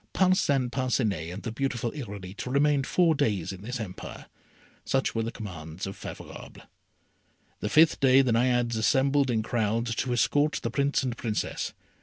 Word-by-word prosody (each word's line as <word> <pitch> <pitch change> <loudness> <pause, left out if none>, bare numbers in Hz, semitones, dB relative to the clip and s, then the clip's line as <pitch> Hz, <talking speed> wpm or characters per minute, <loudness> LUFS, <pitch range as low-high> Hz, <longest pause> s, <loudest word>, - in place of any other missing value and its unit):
Parcin 145 -9 +2
Parcinet 115 - -1
and 90 - -7
the 115 - -3
beautiful 120 -1 -2
Irolite 105 -7 -7
remained 140 +1 +2
four 170 -3 +3
days 110 - 0
in 95 - -10
this 125 +4 -5
empire. 95 -5 -7 0.6
Such 135 0 0
were 115 - 0
the 115 +1 -3
commands 85 -6 -7
of 95 - -6
Favourable. - - -9 1.0
The 105 - -2
fifth 155 +5 +5
day 135 0 +6
the 125 - +1
Naiades 120 0 +2
assembled 135 +4 +2
in 110 -2 +1
crowds 115 +1 0
to 125 - -1
escort 145 +6 +2
the 115 - -2
Prince 140 +2 +1
and 125 -3 -2
Princess. 110 -2 -3
120 Hz, 160 wpm, -27 LUFS, 110-135 Hz, 1.0 s, day